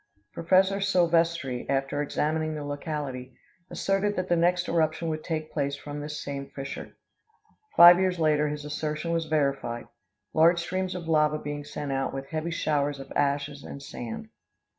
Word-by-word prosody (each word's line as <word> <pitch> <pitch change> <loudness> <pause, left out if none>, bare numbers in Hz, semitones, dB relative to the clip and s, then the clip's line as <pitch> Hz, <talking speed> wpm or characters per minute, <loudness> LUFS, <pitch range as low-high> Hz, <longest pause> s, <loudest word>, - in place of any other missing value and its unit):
Prof. 190 +3 +3
Silvestri, 170 -8 +1
after 135 +1 0
examining 155 +2 -1
the 150 - -5
locality, 145 -3 -5 0.3
asserted 195 +1 0
that 185 -1 -2
the 175 - +4
next 175 +1 +2
eruption 165 0 +1
would 155 0 -3
take 155 -2 -3
place 140 -2 -1
from 145 +1 -7
this 150 +1 -5
same 140 -1 -5
fissure. 135 0 -7 0.8
Five 175 +1 +10
years 185 -1 +1
later 150 -2 +2
his 150 0 -4
assertion 150 +2 -3
was 165 -1 0
verified, 140 -6 0 0.5
large 165 +2 +5
streams 185 +2 -2
of 175 -2 -6
lava 155 -1 +3
being 145 -1 -5
sent 145 -1 -5
out, 135 0 -1
with 135 0 -6
heavy 160 +1 -2
showers 145 -4 0
of 135 - -10
ashes 140 0 0
and - - -8
sand. 140 - -7
155 Hz, 160 wpm, -27 LUFS, 145-170 Hz, 0.8 s, Five